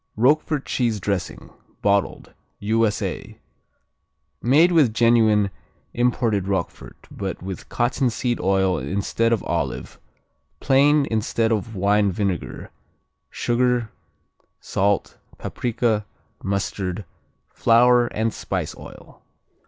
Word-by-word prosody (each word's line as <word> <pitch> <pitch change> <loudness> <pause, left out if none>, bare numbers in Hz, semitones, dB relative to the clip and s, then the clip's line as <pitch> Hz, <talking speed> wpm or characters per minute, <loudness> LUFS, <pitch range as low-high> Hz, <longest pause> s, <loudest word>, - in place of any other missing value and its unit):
Roquefort 145 +4 +2
cheese 115 -4 0
dressing, 100 -1 -4 0.3
bottled 100 -1 0 0.2
U.S.A. 110 0 -1 1.0
Made 155 +9 +4
with 145 -10 +3
genuine 110 -4 +4 0.4
imported 115 -5 +1
Roquefort, 95 -3 -4
but 95 -3 -5
with 95 0 -7
cottonseed 120 0 0
oil 95 -1 +1
instead 100 +4 -1
of 115 - +1
olive, - - -3 0.6
plain 140 +2 +4
instead 110 +1 0
of 110 +1 -2
wine 100 +1 +2
vinegar, 95 -2 -3 0.6
sugar, 120 -2 0 0.7
salt, 100 +1 -1 0.2
paprika, 115 -3 -1 0.4
mustard, 100 -1 -3 0.5
flour 120 +1 +4
and 110 0 -2
spice - - -4
oil. - - -13
110 Hz, 90 wpm, -22 LUFS, 100-120 Hz, 1.0 s, Made